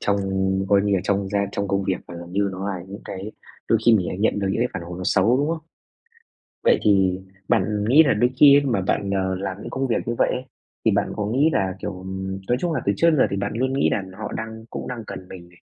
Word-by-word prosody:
trong 100 - +1 0.5
coi 100 0 +5
như 100 -1 +1
là 95 - +1
trong 100 -1 0
gia 100 - 0
trong 100 0 -2
công 100 0 +1
việc 95 - 0
và 85 - -8
gần 85 +1 -9
như 100 +1 +1
nó 95 +2 -4
là 95 -3 -4
những 100 +2 -8
cái 100 +3 -7 0.4
đôi 115 - +4
khi 120 - +8
mình 95 -5 +1
lại 90 - -5
nhận 105 0 +1
được 100 -1 -1
những 105 - -1
cái 125 - +2
phản - - -5
hồi 85 +1 -7
nó 90 - -5
xấu, 100 +5 +3
đúng 145 +3 0
không? 165 0 -1 1.1
Vậy - - +5
thì 95 -2 +3 0.3
bạn 105 +2 +1
nghĩ 145 +6 +8
là 140 -4 +2
đôi 120 +4 +2
khi 140 +1 +8
ấy 145 - 0
mà 120 -8 +1
bạn, 100 +1 -1
ờ, 95 -1 0
làm 95 0 -4
những - - -7
công 135 0 -1
việc 120 - +1
như 120 - -1
vậy - - +3
ấy, 130 - -4 0.4
thì 110 - +5
bạn 100 0 0
có 105 - -2
nghĩ 135 +9 +2
là, 95 -6 0
kiểu, 100 -2 -5
ừm, 95 +1 -5
nói 120 - +3
chung 175 -2 0
là 145 - -1
từ 100 - +3
trước 170 - +4
đến 155 - +1
giờ - - +6
thì 100 - -2
bạn 100 +1 -2
luôn 130 +2 0
nghĩ 135 - +2
là 100 - 0 0.2
họ 110 - -5
đang 110 0 -6
cũng - - -6
đang 120 -3 -5
cần 90 - -8
mình 85 -2 -11
này, 90 0 -22
100 Hz, 280 wpm, -23 LUFS, 95-120 Hz, 1.1 s, khi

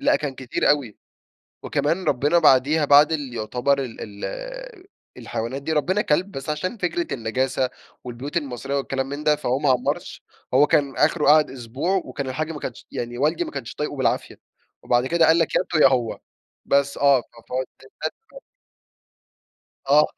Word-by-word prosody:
لأ، - - +3
كان 145 -3 -4
كتير 130 -2 0
أوي. 140 -7 0 0.7
وكمان 165 +6 0
ربينا 150 +2 +2
بعديها 145 +4 +4
بعد 145 +2 +6
اللي 145 -6 -3
يعتبر 125 +5 0
ال 110 -4 -7
ال - - -8 0.3
الحيوانات 120 +4 -4
دي، 160 +3 -2
ربينا 185 +7 +1
كلب، 180 +3 0
بس 135 -2 -6
عشان 170 +9 -2
فكرة 220 - -2
النجاسة 130 +2 -1 0.3
والبيوت 125 +5 -5
المصرية 135 -2 -3
والكلام 135 -1 -2
من 145 +1 -5
ده، 150 -1 +4
فهو 135 -3 -1
ما 145 - +1
عمّرش، 125 -1 -1 0.3
هو 145 +3 +5
كان 145 -4 +1
آخره 150 +1 +2
قعد 155 0 +6
أسبوع 130 +9 -2
وكان 140 -2 -5
الحاج 155 +5 -3
ما 150 - -7
كانش 120 - -7
يعني 120 0 -5
والدي 150 +5 +1
ما - - -7
كانش 135 -5 -6
طايقه 150 -1 -3
بالعافية، 130 - -1 0.4
وبعد 120 +1 +2
كده 170 +2 +3
قال 165 +1 +5
لك: - - 0
"يا - - +4
أنتم 175 -3 -1
يا - - +9
هو." 125 -4 0 0.5
بس، 140 0 +1
آه، 140 -2 +4
ف - - -22 0.3
فوديناه 130 +1 -1 0.3
تبني. 450 - -7 1.5
آه، 150 +2 +6
140 Hz, 170 wpm, -23 LUFS, 130-155 Hz, 1.5 s, يا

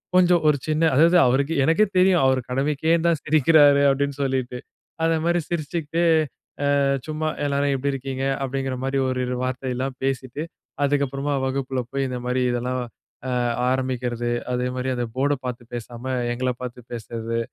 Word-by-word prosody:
கொஞ்சம் 180 -2 +5
ஒரு 145 - +3
சின்ன 155 +1 +1
அதாவது 170 +4 +6
அவருக்கே 140 +4 +1
எனக்கே 180 +7 +4
தெரியும், 180 -4 +4
அவரு 130 -1 +3
கடமைக்கேன் 150 +5 +1
தான் 160 -4 0
சிரிக்கிறாரு 145 -1 +5
அப்படினு 140 0 0
சொல்லிட்டு. 130 -2 -2 0.4
அந்த 165 0 +3
மாரி 175 0 +2
சிரிச்சிக்கிட்டே 165 0 -1 0.7
அ - - +3 0.2
சும்மா, 155 0 -2 0.2
"எல்லாரும் 140 0 +1
எப்படி 140 +2 -1
இருக்கீங்க?" 135 0 -4 0.2
அப்படிங்கற 135 0 -2
மாரி 135 +1 0
ஒரு 130 0 -1
இரு 125 - -2
வார்த்தைல்லாம் 130 0 -3
பேசிட்டு, 135 +2 -2 0.4
அதுக்கு 140 0 +2
அப்புறமா 140 +2 -2
வகுப்புல 130 -1 -2
போயி, 135 0 -1
இந்த 125 - -3
மாதிரி 125 +1 0
இதெல்லாம் 125 +1 -2 0.5
அ - - -1 0.4
ஆரம்பிக்கறது. 125 -2 -1 0.2
அதே 125 0 0
மாரி 130 +1 -2
அந்த 120 - -1
போர்ட்ட 145 +2 +2
பார்த்து 120 -1 -4
பேசாம, 120 +1 -7 0.3
எங்கள 130 +1 -1
பார்த்து 125 0 -6
பேசுறது, 115 0 -4
135 Hz, 155 wpm, -23 LUFS, 125-150 Hz, 0.7 s, அதாவது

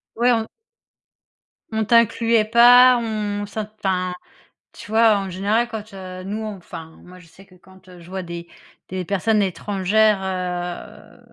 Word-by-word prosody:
Ouais, 240 +2 +3
on 225 -2 0 1.2
on 220 -1 -1
t'incluait 230 0 +3
pas, 245 +3 +7
on 210 -2 -3
ça 210 +1 -5
t 215 - -23
enfin, 185 -2 -1 0.6
tu 210 - -12
vois? 220 -1 +4
En 195 - -5
général, 205 +6 0
quand, 215 -2 -8
heu, 185 -1 -9
nous 210 +3 -5
enfin, 175 -6 -8
moi, 180 0 -14
je 170 - -18
sais 165 +4 -18
que 185 - -23
quand, 190 0 -20
heu, 180 -1 -14
je 170 - -15
vois 190 0 -5
des 170 0 -8 0.4
des 185 0 -4
personnes 205 +3 +1
étrangères, 200 +2 +1
heu, 180 -2 -5
200 Hz, 160 wpm, -21 LUFS, 185-220 Hz, 1.2 s, pas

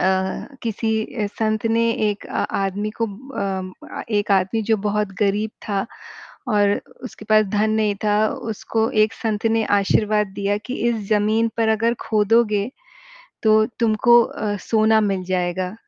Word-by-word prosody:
अ, - - 0 0.6
किसी 225 0 -2 0.3
ए 205 - +1
संत 215 +1 -1
ने 230 +1 +2 0.2
एक 205 - -7
आ - - -2 0.2
आदमी 205 +2 -2
को 230 - +2
म 200 -5 -5
म - - -7 0.2
एक 205 0 -2
आदमी 195 +4 +1
जो 220 - +5
बहुत 210 0 0
गरीब 210 +2 +1 0.2
था 200 0 -1 0.6
और 205 -2 +3 0.3
उसके 230 -3 -9
पास 215 0 +6
धन 210 +2 +1
नहीं 215 -2 +1
था, 210 +1 +3
उसको 225 0 -2
एक 215 - +1
संत 220 -1 -2
ने 225 0 +2 0.2
आशीर्वाद 210 +1 +2
दिया 200 0 0
कि, 250 +5 -6
"इस 235 - +1
ज़मीन 215 +2 +2
पर 225 -1 +2
अगर 225 +2 +2
खोदोगे 210 -1 +2 0.8
तो 215 0 +5 0.3
तुमको 235 +1 +5
अ, 205 -2 -3
सोना 220 0 +4
मिल 195 -3 -1
जाएगा।" 180 +1 -2
215 Hz, 155 wpm, -21 LUFS, 205-225 Hz, 0.8 s, पास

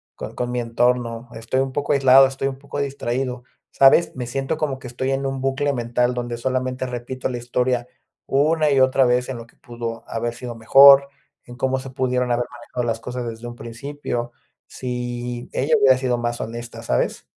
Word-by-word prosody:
con - - -8
con 125 0 -2
mi 125 - -1
entorno. 120 0 0
Estoy 115 +4 -1
un 135 0 -2
poco 145 +1 0
aislado, 135 -1 +7
estoy 135 +1 -3
un 135 - -7
poco 140 +1 -8
distraído, 130 -2 -3 0.3
¿sabes?, 135 +5 +5
me 125 -1 -4
siento 135 +5 -2
como 140 -4 -2
que 130 - -9
estoy 130 +2 -3
en 135 0 -1
un 135 0 -3
bucle 135 +2 0
mental 120 0 0
donde 120 -1 -3
solamente 130 +1 -2
repito 125 +1 -4
la 125 - -3
historia 125 0 -1 0.4
una 150 +2 +2
y 135 - +3
otra 130 0 +4
vez 125 +1 +1
en 130 - -4
lo 115 - -9
que 115 - -26
pudo 115 -1 -6
haber 115 +1 -3
sido 120 0 -7
mejor, 140 +4 +7 0.3
en 120 - -12
cómo 130 +1 0
se 130 0 -7
pudieron 125 -1 0
haber 120 0 +1
manejado 120 +1 -6
las 115 -1 -1
cosas 125 +1 -5
desde 115 +1 -9
un 120 0 -7
principio. 120 0 -5 0.3
Sí, 120 -1 -5
ella 150 +4 +2
hubiera 135 -2 +6
sido 125 -2 0
más 120 0 -2
honesta, 115 +1 -7
¿sabes? - - -1
125 Hz, 195 wpm, -22 LUFS, 120-135 Hz, 0.4 s, aislado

